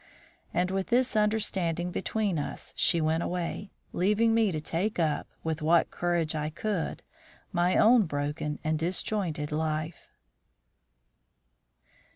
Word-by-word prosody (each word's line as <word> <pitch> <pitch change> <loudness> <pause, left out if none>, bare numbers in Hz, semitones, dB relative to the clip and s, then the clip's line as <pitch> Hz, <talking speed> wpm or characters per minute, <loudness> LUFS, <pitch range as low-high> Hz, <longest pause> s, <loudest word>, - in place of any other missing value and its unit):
And 180 +2 0
with 190 0 -1
this 250 0 +2
understanding 190 -5 +1
between 200 -2 -1
us 145 - -5
she 170 - +3
went 160 +1 +1
away, 180 +3 -3 0.2
leaving 210 +5 +3
me 225 -3 +3
to 155 - -2
take 175 +8 -2
up, 160 -3 0 0.2
with 160 -1 -2
what 165 +2 +3
courage 175 -3 0
I 150 -1 -2
could, 180 +1 -3 0.5
my 175 +1 +2
own 225 -3 +6
broken 150 +1 -3
and 155 0 0
disjointed 170 -3 -1
life. 155 +1 -2
175 Hz, 125 wpm, -28 LUFS, 155-205 Hz, 0.5 s, own